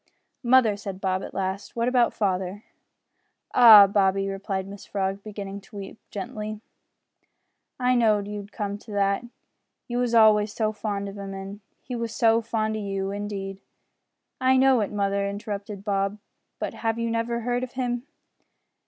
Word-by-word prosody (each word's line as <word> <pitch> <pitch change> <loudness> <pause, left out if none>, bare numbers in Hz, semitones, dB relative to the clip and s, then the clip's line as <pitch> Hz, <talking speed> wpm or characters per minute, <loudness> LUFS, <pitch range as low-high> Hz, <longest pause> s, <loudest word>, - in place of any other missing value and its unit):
"Mother," 240 -4 +4
said 195 -2 -6
Bob, 190 -1 0
at - - -8
last, 195 +1 -3
"what 235 0 0
about 250 -1 +3
father?" 190 0 -2 0.9
"Ah! 220 -4 +10
Bobby," 195 -1 +2
replied 195 -1 -3
Mrs 200 0 -10
Frog, 195 0 -2
beginning 200 -1 -7
to 195 - -17
weep, 200 +2 -8
gently, 210 +2 -5 1.2
"I 250 0 +3
know'd 215 -4 +3
ye 210 0 -5
would 205 +1 -10
come 205 -2 -4
to 215 - -13
that 200 +1 +1 0.6
you 240 0 -2
was 245 -1 +1
always 215 -2 +5
so 215 -2 0
fond 205 -2 -3
of 200 +1 -8
'im, 195 -1 -6
an' 195 +2 -8 0.2
he 250 - -5
was 230 -1 -4
so 230 -1 +4
fond 220 -1 -1
o' - - -3
you 195 -2 -3
too, 195 - -2
indeed 200 -1 -5 0.4
" - - -45
"I 260 0 +4
know 260 -2 +5
it, 205 - -2
mother," 200 -1 0
interrupted 200 0 -6
Bob, 200 0 0 0.4
"but - - -4
have 225 0 -2
you 230 0 -1
never 235 +1 -1
heard 245 +1 -1
of 255 - -6
him?" 245 0 -2
205 Hz, 170 wpm, -25 LUFS, 195-230 Hz, 1.2 s, Ah